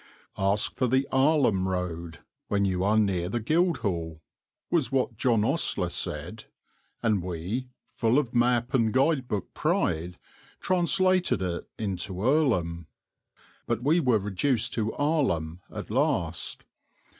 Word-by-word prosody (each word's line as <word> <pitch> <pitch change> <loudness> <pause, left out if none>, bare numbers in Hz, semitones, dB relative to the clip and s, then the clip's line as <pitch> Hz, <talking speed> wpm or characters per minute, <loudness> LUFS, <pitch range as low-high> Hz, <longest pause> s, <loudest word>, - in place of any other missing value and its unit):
"Ask 100 +2 +1
for 130 - +2
the 130 +3 +1
Arlham 130 -9 +3
Road 85 -3 -4 0.3
when 100 -1 +1
you 95 -1 0
are 105 +2 +3
near 95 -5 +1
the 120 - -1
Guildhall," 110 - 0 0.5
was 160 -6 +1
what 130 -3 0
John 115 -2 +2
Ostler - - +1
said, - - -4 0.6
and 105 -4 +2
we, 90 +9 -4 0.2
full 115 +2 +1
of 130 -5 0
map 120 0 +2
and 115 -4 +3
guide 135 +1 +2
book 105 -5 -4
pride, 85 +3 -1 0.4
translated 185 - +2
it 85 -2 -4
into 95 -2 -3
Earlham; 105 - +1 0.8
but 120 0 -1
we 155 +6 +3
were 125 -8 +3
reduced 105 +5 0
to 110 -2 -1
Arlham 130 - 0
at - - -7
last. - - -1
110 Hz, 130 wpm, -27 LUFS, 90-130 Hz, 0.8 s, Arlham